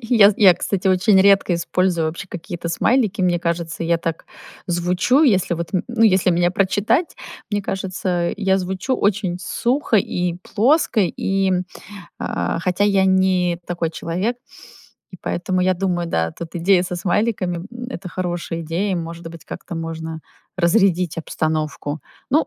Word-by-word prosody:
Я, 220 -3 +6
з - - -5
я, 190 -5 +7
кстати, 190 +1 -1
очень 190 +1 +4
редко 195 -2 +4
использую 170 -1 0
вообще 165 +5 -5
какие-то 170 0 -6
смайлики. 220 +3 +1
Мне 175 -1 +2
кажется, 170 -1 -3
я 170 0 +2
так 165 -1 -4 0.4
звучу, 180 - +2
если 190 - +3
вот 165 0 -5
н 180 - +2
ну, 235 -2 0
если 190 -4 +4
меня 175 +1 +2
прочитать. 205 - +1 0.4
Мне 205 -1 -1
кажется, 185 -2 -2
я 195 -2 +2
звучу 190 +8 -2
очень 195 -3 0
сухо 240 +4 0
и 180 -2 0
плоско, 250 +1 +2
и, 195 +1 0 0.7
э, - - -2
хотя 185 +3 0
я 195 -2 +3
не 185 -2 +2
такой 170 -2 -2
человек. 185 +9 -2 0.7
И 185 - -10
поэтому 185 +1 -1
я 185 0 +2
думаю, 175 -2 -1
да, 80 - 0
тут 170 +1 -9
идея 180 +2 +3
со 180 -1 -4
смайликами 185 0 0
н- 175 - -8 0.2
это 185 -5 -6
хорошая 175 -1 -3
идея, 180 +5 -1
и, - - +1
может 165 -1 -5
быть, 165 -1 -12
как-то 170 - -8
можно 160 0 -5 0.4
разрядить 180 -2 +2
обстановку. 155 -2 -3 0.3
Ну, 310 +4 +3
180 Hz, 155 wpm, -20 LUFS, 170-195 Hz, 0.7 s, я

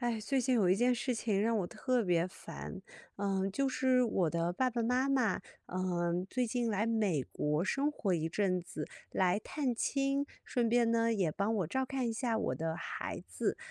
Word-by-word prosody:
哎， 240 -2 0
最 265 +5 +1
近 255 +1 +2
有 200 -5 +3
一 185 - +5
件 245 +5 +3
事 245 +1 -1
情 215 -3 0
让 225 +2 +2
我 185 - -1
特 240 +5 0
别 175 -2 +2
烦。 190 +1 -8 0.3
呃， 195 -1 0
就 275 +5 +1
是 255 -1 +3
我 195 -8 +2
的 170 +2 0
爸 255 +8 +1
爸 235 -1 -1
妈 250 +3 +2
妈， 255 -7 +2 0.3
呃， 180 -1 -1
最 255 +3 0
近 240 0 -1
来 210 0 +1
美 215 -10 +1
国 150 +5 -1
生 275 +8 +1
活 220 -10 -1
一 160 -2 0
阵 185 +1 +1
子， 165 -3 -6 0.2
来 185 +1 +2
探 270 +3 -2
亲， 275 +3 0 0.2
顺 240 -2 0
便 235 0 +3
呢， 230 0 +3
也 185 -6 +1
帮 200 +7 0
我 190 -6 0
照 260 +10 -1
看 260 -2 -1
一 - - -1
下 230 0 0
我 - - 0
的 160 0 -2
孩 170 - -5
子。 - - -1
220 Hz, 220 characters per minute, -33 LUFS, 185-250 Hz, 0.3 s, 一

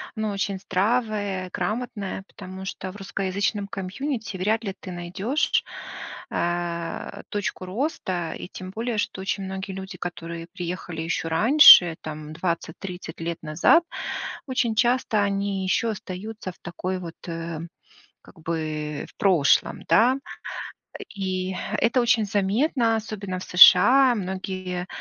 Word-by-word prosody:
оно 215 -1 -1
очень 200 0 -2
здравое, 200 -2 0
грамотное, 205 -1 -3
потому 190 -1 -9
что 190 0 -5
в 195 - -15
русскоязычном 200 +1 -2
комьюнити 215 +2 -4
вряд 220 +5 +1
ли 195 -2 -3
ты 185 - -8
найдешь, 185 - 0 0.7
э, 170 -1 -3
точку 205 -2 -3
роста. 185 - -2
И - - -7
тем 185 0 -8
более, 230 +2 -3
что 200 -2 -2
очень 195 +1 -2
многие 190 0 -5
люди, 190 -1 -7
которые 170 -1 -6
приехали 175 -2 -5
еще 165 0 -2
раньше, 175 - +8
там, 155 0 -7
20-30 170 +1 -4
лет 165 0 -4
назад, 160 - +4 0.6
очень 245 -4 0
часто 240 -2 +2
они 200 -1 -1
еще 225 +5 +1
остаются 195 0 -6
в - - -23
такой 185 +2 -4
вот, 170 -2 -8
э, 165 -1 -4 0.6
как 170 - -17
бы, 155 -2 -3
в - - -27
прошлом, 175 -8 +3
да. 245 +5 +5 1.0
И 185 -1 -2 0.2
это 235 +2 +3
очень 230 -3 +3
заметно, 225 +4 +1
особенно 200 -4 -4
в - - -6
США. 250 +9 +8
Многие 185 -2 -4
190 Hz, 125 wpm, -25 LUFS, 175-215 Hz, 1.0 s, раньше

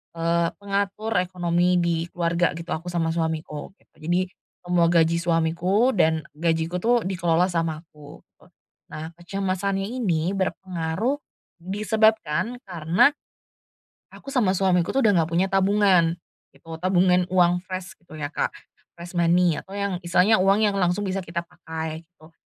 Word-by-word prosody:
eee, 170 0 +1
pengatur 200 +2 -2
ekonomi 180 0 +1
di 170 -1 +1 0.2
keluarga 170 0 +1
gitu, 165 +1 -8
aku 165 +3 -9
sama 165 -2 0
suamiku 160 -2 -3
gitu. - - -34
Jadi 175 +3 +1 0.4
semua 175 -1 +3
gaji 165 -1 +3
suamiku 170 +7 +2
dan 160 -2 +3 0.2
gajiku 165 +1 0
itu 230 +6 +1 0.2
dikelola 175 -2 +1
sama 165 -3 -1
aku. 150 -3 -14 0.7
Nah 160 +1 -6
kecemasannya 195 +2 -2
ini 185 -10 -1
berpengaruh 190 - -2 0.4
disebabkan 215 +1 0
karena 175 - +3 1.0
aku - - -16
sama 225 -8 +3
suamiku 180 -3 +2
tuh 270 - +2
udah - - +5
enggak 160 - -2
punya 180 +3 +2
tabungan 195 -3 +3 0.4
gitu. 165 0 -10
Tabungan 180 -1 +3
uang 180 -1 +3
fresh 185 0 -6
gitu 165 -3 -13
ya 145 -1 -4
Kak, - - 0 0.5
fresh 175 +1 -9
money 175 -1 +2
atau 190 - -14
yang 200 -3 -2
istilahnya 180 +4 +3
uang 195 +3 +4
yang 205 - +1
langsung 180 +2 +1
bisa 195 0 -2
kita 170 -1 -5
pakai 160 -1 -6
gitu. 165 -2 -20
175 Hz, 140 wpm, -24 LUFS, 165-195 Hz, 1.0 s, udah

